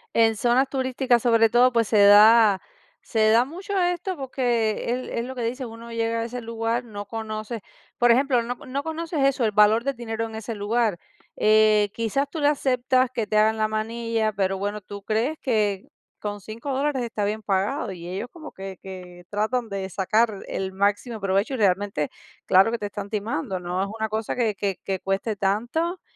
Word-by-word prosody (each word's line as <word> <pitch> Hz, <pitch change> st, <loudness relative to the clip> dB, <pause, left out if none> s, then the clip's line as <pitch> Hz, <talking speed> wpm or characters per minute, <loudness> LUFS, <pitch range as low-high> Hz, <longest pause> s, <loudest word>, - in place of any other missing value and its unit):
En 225 Hz, -1 st, +4 dB
zonas 245 Hz, +4 st, +2 dB
turísticas, 260 Hz, -2 st, +1 dB
sobre 230 Hz, -2 st, +4 dB
todo, 245 Hz, +2 st, +5 dB
pues 230 Hz, -2 st, +1 dB
se 215 Hz, -, +3 dB
da 210 Hz, 0 st, +7 dB, 0.4 s
se 220 Hz, -1 st, +2 dB
da 235 Hz, +3 st, +5 dB
mucho 380 Hz, +6 st, -4 dB
esto, 355 Hz, +1 st, -1 dB
porque 240 Hz, -5 st, -1 dB
es 255 Hz, +1 st, -3 dB
es 235 Hz, -, -2 dB
lo 260 Hz, +1 st, -7 dB
que 245 Hz, -, -4 dB
dicen, 250 Hz, +2 st, -3 dB
uno 230 Hz, +1 st, -10 dB
llega 230 Hz, 0 st, -1 dB
a 230 Hz, -, -1 dB
ese 245 Hz, +1 st, -6 dB
lugar, 230 Hz, +1 st, -2 dB
no 205 Hz, -3 st, -8 dB
conoce. 215 Hz, +1 st, -5 dB, 0.3 s
Por 240 Hz, 0 st, +5 dB
ejemplo, 250 Hz, -1 st, +3 dB
no 245 Hz, +1 st, -4 dB
no 270 Hz, +3 st, -5 dB
conoces 320 Hz, -1 st, -3 dB
eso, 270 Hz, -3 st, +2 dB
el 210 Hz, -, 0 dB
valor 215 Hz, +4 st, +4 dB
del 275 Hz, -1 st, -1 dB
dinero 225 Hz, -1 st, -3 dB
en 225 Hz, -1 st, -8 dB
ese 225 Hz, +1 st, -5 dB
lugar. 210 Hz, -2 st, 0 dB, 0.4 s
Eh, 215 Hz, -1 st, +4 dB
quizás 270 Hz, +6 st, -1 dB
tú 320 Hz, -, -5 dB
le 290 Hz, -, +4 dB
aceptas 255 Hz, -2 st, +1 dB
que 240 Hz, -4 st, -2 dB
te 215 Hz, 0 st, 0 dB
hagan 220 Hz, +1 st, +4 dB
la 215 Hz, 0 st, +1 dB
manilla, 225 Hz, 0 st, -1 dB
pero 195 Hz, -1 st, 0 dB
bueno, 205 Hz, +2 st, -3 dB
tú 200 Hz, +1 st, -9 dB
crees 230 Hz, +9 st, 0 dB
que 210 Hz, -6 st, 0 dB, 0.3 s
con 205 Hz, -1 st, -5 dB
$5 230 Hz, +7 st, -6 dB
dólares 275 Hz, -1 st, 0 dB
está 225 Hz, -3 st, -3 dB
bien 215 Hz, +2 st, -1 dB
pagado 205 Hz, +5 st, -1 dB
y 170 Hz, -1 st, -10 dB
ellos 195 Hz, +6 st, -4 dB
como 315 Hz, -3 st, -10 dB
que 190 Hz, -1 st, -8 dB
que 180 Hz, -2 st, -10 dB
tratan 220 Hz, +3 st, -1 dB
de 195 Hz, -1 st, -4 dB
sacar 210 Hz, +3 st, +1 dB
el 190 Hz, 0 st, -4 dB
máximo 205 Hz, +3 st, -1 dB
provecho. 195 Hz, +6 st, 0 dB
Y, 260 Hz, -, -2 dB
realmente, 195 Hz, -6 st, +1 dB, 0.4 s
claro 190 Hz, +3 st, +5 dB
que 235 Hz, -, -1 dB
te 205 Hz, -, -3 dB
están 205 Hz, 0 st, -7 dB
timando, 195 Hz, -4 st, -3 dB
no 180 Hz, +1 st, -2 dB
es 200 Hz, -, -1 dB
una 220 Hz, 0 st, -2 dB
cosa 220 Hz, 0 st, -2 dB
que 225 Hz, -4 st, 0 dB
que 195 Hz, -1 st, -2 dB
que 190 Hz, -2 st, -2 dB
cueste 195 Hz, +2 st, -2 dB
tanto. 240 Hz, -, -1 dB
225 Hz, 195 wpm, -24 LUFS, 205-245 Hz, 0.4 s, da